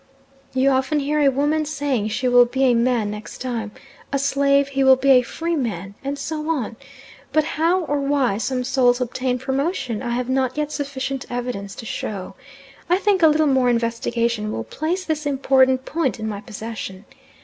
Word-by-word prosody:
You 260 +1 +4
often 265 +3 +1
hear 295 +2 0
a 285 -2 +5
woman 290 +4 +1
saying 285 -7 -1
she 225 +4 -1
will 245 0 +6
be 265 +3 -1
a 255 -2 +5
man 235 -3 +1
next 210 0 -8
time, 235 -4 -4 0.4
a 280 - +1
slave 280 0 +2
he 275 0 0
will 265 0 +7
be 270 +1 +2
a 255 -1 +7
freeman, 235 - -3
and 280 +1 -3
so 310 +1 -4
on, 255 -8 -1 0.6
but 310 - +3
how 335 +5 +1
or 290 -3 -1
why 275 -7 +1
some 250 +1 -1
souls 250 -1 +3
obtain 250 0 -1
promotion 265 - -2
I 240 -2 -2
have 250 0 -2
not 260 0 0
yet 300 0 -1
sufficient 275 -2 -4
evidence 240 -5 -4
to 230 - -8
show. 195 -3 -5 0.6
I 355 - +4
think 395 -1 +2
a 325 - +8
little 310 0 +3
more 265 -3 +3
investigation 230 -1 0
will 110 - -3
place 325 - -3
this 310 -2 -2
important 260 -1 +3
point 310 -7 -1
in 220 - -3
my 205 -2 -4
possession. 210 -2 -7
260 Hz, 180 wpm, -22 LUFS, 235-285 Hz, 0.6 s, a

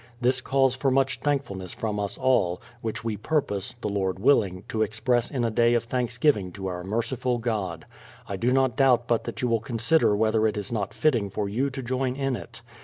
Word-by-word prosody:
This 130 +1 +2
calls 135 -1 +2
for 135 +1 +1
much 135 0 +1
thankfulness 115 -11 -2
from 105 -2 -2
us 100 -1 -3
all, 125 -10 +2 0.2
which 110 -1 -4
we 110 -2 -2
purpose, 125 -4 -1
the - - -2
Lord 95 -2 -1
willing, 100 -5 +2
to 110 - -1
express 115 +3 +1
in 125 -4 -1
a 115 - 0
day 120 +2 +3
of 120 - +1
Thanksgiving 120 -4 0
to 95 -1 -7
our 90 -1 -4
merciful 120 +5 -1
God. 110 -5 -3 0.4
I 100 - -3
do 115 +6 0
not 130 -2 +2
doubt 125 -3 +3
but 120 -2 +1
that - - -5
you - - +3
will 115 -1 +2
consider 115 +2 +2
whether 110 +1 +2
it 105 - -2
is 105 0 -4
not 105 -4 -2
fitting 120 -10 +2
for 100 +1 -2
you 125 +8 0
to 135 0 -6
join 130 +1 -1
in 135 -1 -1
it. 120 - -10
115 Hz, 210 wpm, -26 LUFS, 105-130 Hz, 0.4 s, day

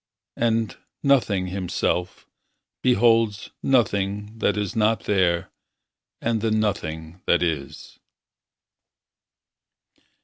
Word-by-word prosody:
And, 115 -4 0 0.3
nothing 115 -9 +3
himself, 90 -1 -2 0.6
beholds 115 -4 +3
Nothing 105 -4 +1
that 105 - +1
is 105 -3 -2
not 110 0 +2
there 90 -4 +1 0.7
and 115 -2 0
the 115 - +1
nothing 90 -6 -2
that 85 0 +3
is. 80 -5 -4
105 Hz, 80 wpm, -24 LUFS, 90-115 Hz, 0.7 s, nothing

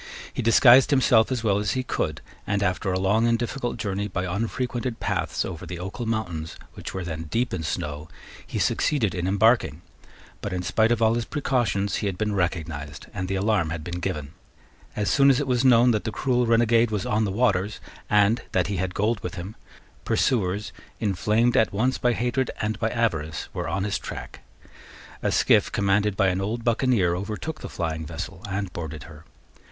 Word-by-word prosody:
He - - -2
disguised 120 +3 +7
himself 125 -5 +4
as 125 -3 -1
well 100 -2 +2
as 105 - 0
he 130 -1 -1
could, - - -2 0.3
and, 100 0 0
after 95 0 0
a 90 - 0
long 105 +5 +2
and 115 0 +3
difficult 120 +1 -3
journey 100 0 -2
by 95 -2 -3
unfrequented 115 +5 -2
paths - - -1
over 90 -2 -6
the 90 0 -6
Ochill 95 +7 -5
mountains, 90 -8 -3 0.2
which - - -7
were 95 - -4
then 80 -1 -5
deep 120 +9 -1
in 90 - -2
snow, 75 0 -4 0.4
he - - -4
succeeded 125 -10 +1
in 90 0 -2
embarking: 100 - +2 0.6
but, 100 - -4
in 90 -1 -2
spite 110 +5 +2
of 115 -1 +2
all 110 0 +4
his 120 0 -1
precautions, 120 -9 0
he 105 - -2
had 95 -2 -3
been 105 0 -1
recognised, 80 -6 -3
and 90 0 -3
the 95 - -1
alarm 95 -4 +1
had 80 -1 -4
been 85 +2 -5
given. 75 -6 -4 0.6
As 105 -1 0
soon 140 -1 +5
as 135 0 +4
it 145 - -1
was 125 -2 +1
known 125 -1 +6
that 105 -2 0
the 110 - -3
cruel 125 0 +1
renegade 115 0 +4
was 105 -3 -2
on 105 +1 +1
the 100 - -1
waters, 105 -2 +1 0.3
and 105 +3 +4
that 90 -2 +2
he 100 0 -2
had 90 0 -2
gold 105 +2 +1
with - - -6
him, 95 +4 -7 0.5
pursuers, 105 -4 0 0.3
inflamed 110 +4 +1
at 110 - +3
once 125 +6 0
by 120 -1 +2
hatred 125 +3 0
and 110 0 -2
by 110 - +1
avarice, 80 -11 -1
were - - -3
on 95 +3 -1
his 100 -1 -1
track, - - -8 0.8
A - - 0
skiff, - - +3
commanded 100 0 +1
by 95 - +4
an 90 +1 -1
old 115 +4 -3
buccaneer, 115 -7 +2
overtook 110 - -5
the - - -6
flying 80 -2 -3
vessel 85 +3 -7
and 95 -2 -3
boarded 80 -2 -6
her. 80 -2 -13
105 Hz, 195 wpm, -25 LUFS, 90-115 Hz, 0.8 s, disguised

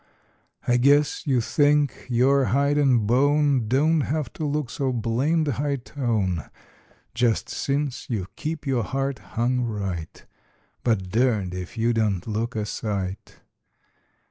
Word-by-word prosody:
I 120 - +4
guess 145 +4 +3
you 130 -4 +3
think 145 +3 +1
your 130 +3 +3
hide 140 +4 +2
and 125 -6 +3
bone 140 +1 +3
Don't 150 +6 +3
have 145 -2 -2
to - - -6
look 145 -3 -2
so 135 -4 -1
blamed 130 +8 0
high 140 +1 0
tone 115 - -2 0.6
Just 120 -1 +1
since 140 -1 -2
you 105 -7 -2
keep 155 0 -4
your 130 -3 +1
heart 135 +1 -2 0.2
hung 125 +2 +1
right,— 100 -8 -4 0.6
But 105 -6 0
durned 110 -6 +1
if 90 +4 -7
you 115 +1 +2
don't 105 -5 0
look 115 +2 -3
a 105 -1 -1
sight. 100 -2 -4
125 Hz, 135 wpm, -24 LUFS, 110-140 Hz, 0.6 s, I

